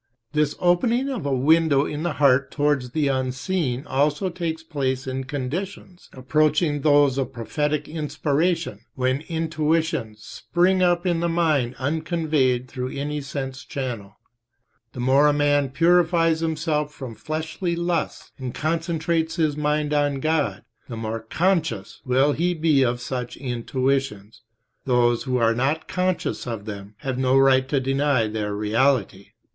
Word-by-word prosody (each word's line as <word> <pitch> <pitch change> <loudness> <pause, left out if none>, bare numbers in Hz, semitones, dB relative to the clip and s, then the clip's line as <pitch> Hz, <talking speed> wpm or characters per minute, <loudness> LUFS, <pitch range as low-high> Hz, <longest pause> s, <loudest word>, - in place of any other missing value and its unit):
This 150 -1 +1
opening 230 +10 +2
of 250 - -3
a - - -1
window 145 +1 +3
in 150 0 -4
the 175 -1 -1
heart 140 -1 +3
towards 145 -4 0
the 145 +3 0
unseen 130 +1 -1
also 150 +7 0
takes 165 -2 -4
place 135 -5 -2
in 130 0 -4
conditions. 175 +7 -5
approaching 150 +3 +1
those 145 -2 +4
of 135 - -2
prophetic 150 +5 -2
inspiration, 150 - -1 0.2
when 130 +1 0
intuitions 160 -8 -1
spring 185 +8 +1
up 175 0 +2
in 175 -2 +1
the 170 0 0
mind 155 -7 +1
unconveyed 150 -3 0
through 130 -1 -4
any 145 +2 -3
sense 135 -2 -5
channel. 115 -7 -5 0.8
The - - -8
more 135 +4 +4
a 150 - +4
man 145 -1 +2
purifies 165 +2 +3
himself 155 -2 -1
from 130 -5 -8
fleshly 160 - -3
lusts 170 -1 -2
and 130 -2 -5
concentrates 165 0 -1
his 155 -4 +1
mind 150 0 0
on 145 -2 +1
God, 155 0 0 0.3
the 115 - -5
more 110 0 -3
conscious 165 - -1
will 135 +3 +3
he 175 +4 0
be 155 -4 +3
of 120 -1 +1
such 125 0 -5
intuitions. 130 -3 -2 0.4
Those 120 -2 +2
who 130 -1 0
are 115 -1 +3
not 135 +7 -1
conscious 185 -7 -1
of 115 -4 -5
them 100 -1 -8
have 130 -2 -3
no 130 0 +3
right 135 -1 +4
to 140 - +2
deny 135 -2 +1
their 105 -1 -3
reality. 110 -1 +1
145 Hz, 145 wpm, -23 LUFS, 130-160 Hz, 0.8 s, those